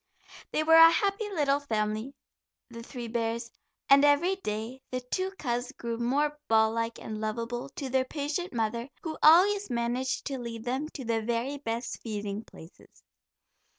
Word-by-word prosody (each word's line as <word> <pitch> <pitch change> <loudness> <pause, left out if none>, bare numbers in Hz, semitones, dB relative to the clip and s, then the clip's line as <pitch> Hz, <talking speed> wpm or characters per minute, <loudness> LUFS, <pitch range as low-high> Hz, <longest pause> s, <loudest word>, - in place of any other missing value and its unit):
They 310 - +1
were 325 +1 +4
a 330 0 +10
happy 400 +5 0
little 290 -7 +1
family, 220 -1 -2 0.6
the 230 0 -8
three 240 0 -7
bears, 230 0 -2 0.4
and 275 +1 +7
every 290 +6 +4
day 225 - -5
the 255 - -2
two 370 +10 -2
cubs 245 -2 -2
grew 235 -3 -5
more 290 +5 0
ball 220 0 +4
like 230 0 -2
and 215 -1 -6
lovable 230 +4 -3
to 275 - -4
their 260 0 +1
patient 300 +6 -3
mother, 235 +2 -2
who 315 -2 -5
always 390 +5 +6
managed 240 +2 -1
to 275 -2 -3
lead 230 -2 -6
them 260 +5 -2
to 265 - -6
the 225 -1 0
very 240 +5 -2
best 235 -2 -4
feeding 210 -1 -4
places. 160 -4 -16
245 Hz, 160 wpm, -29 LUFS, 230-290 Hz, 0.6 s, a